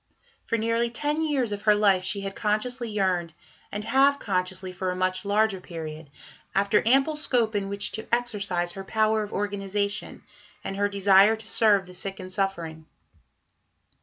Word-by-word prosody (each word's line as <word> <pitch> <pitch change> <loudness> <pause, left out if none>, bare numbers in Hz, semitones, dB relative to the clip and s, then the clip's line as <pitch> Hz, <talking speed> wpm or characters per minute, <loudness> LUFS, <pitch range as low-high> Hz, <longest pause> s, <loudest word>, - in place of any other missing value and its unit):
For 230 - +1
nearly 230 +1 0
ten 295 +6 -1
years 280 -8 0
of 205 0 -4
her 210 -1 +4
life 200 -3 +3
she 195 +2 0
had 195 0 -5
consciously 235 +3 -1
yearned, 185 -5 -1 0.4
and 210 +1 -4
half 275 +5 +4
consciously 185 -3 -2
for 185 0 -3
a 180 - -2
much 185 +1 -1
larger 205 -1 +1
period, 160 -3 -8 0.5
after 200 +1 +3
ample 270 +5 +3
scope 245 -7 +1
in 200 -1 -2
which 200 0 -1
to 220 - -6
exercise 205 -7 0
her 195 +2 -7
power 215 +2 +1
of 210 - -5
organization, 200 0 -3 0.4
and 195 - -4
her 205 +1 +1
desire 200 +1 +5
to 220 0 -12
serve 210 -4 +3
the 180 - -13
sick 195 +2 -5
and 185 0 -8
suffering. 170 -5 -3
200 Hz, 165 wpm, -26 LUFS, 185-220 Hz, 0.5 s, desire